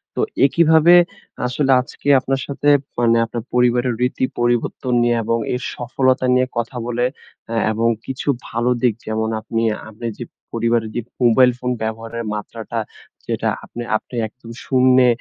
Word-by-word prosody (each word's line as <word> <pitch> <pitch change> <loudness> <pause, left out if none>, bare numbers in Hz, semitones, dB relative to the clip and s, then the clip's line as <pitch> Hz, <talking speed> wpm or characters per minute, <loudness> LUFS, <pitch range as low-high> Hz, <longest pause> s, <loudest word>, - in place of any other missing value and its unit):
তো - - 0 0.2
একইভাবে 160 +3 +5 0.5
আসলে 135 +2 0
আজকে 140 +1 -11
আপনার 135 +1 -2
সাথে 145 +1 0 0.3
মানে 115 -1 +4
আপনার 115 0 -5
পরিবারের 125 0 +2
রীতি 125 +1 +1
পরিবর্তন 120 +1 0
নিয়ে, 120 0 +2
এবং 115 +1 0 0.2
এর 125 - -2
সফলতা 130 +1 +1
নিয়ে 130 0 +3
কথা 120 +2 -3
বলে 120 0 0 0.5
এ - - -1 0.2
এবং 115 +2 +1 0.2
কিছু 130 +1 -6 0.2
ভালো 120 +2 0
দিক 125 -3 +3
যেমন 110 0 -1
আপনি, 115 +1 -2 0.3
আপনি 110 +2 -9
যে, 120 - -5 0.3
পরিবারের 115 -1 +1
যে, 120 - 0 0.2
মোবাইল 125 +2 +5
ফোন 125 0 -2
ব্যবহারের 115 +1 -4
মাত্রাটা 110 +2 -5 0.5
যেটা - - -1
আপনে 120 - -7
আপনে 125 - -12
একদম 115 +1 -14
শুন্যে 130 -1 +4
120 Hz, 150 wpm, -20 LUFS, 115-130 Hz, 0.5 s, একইভাবে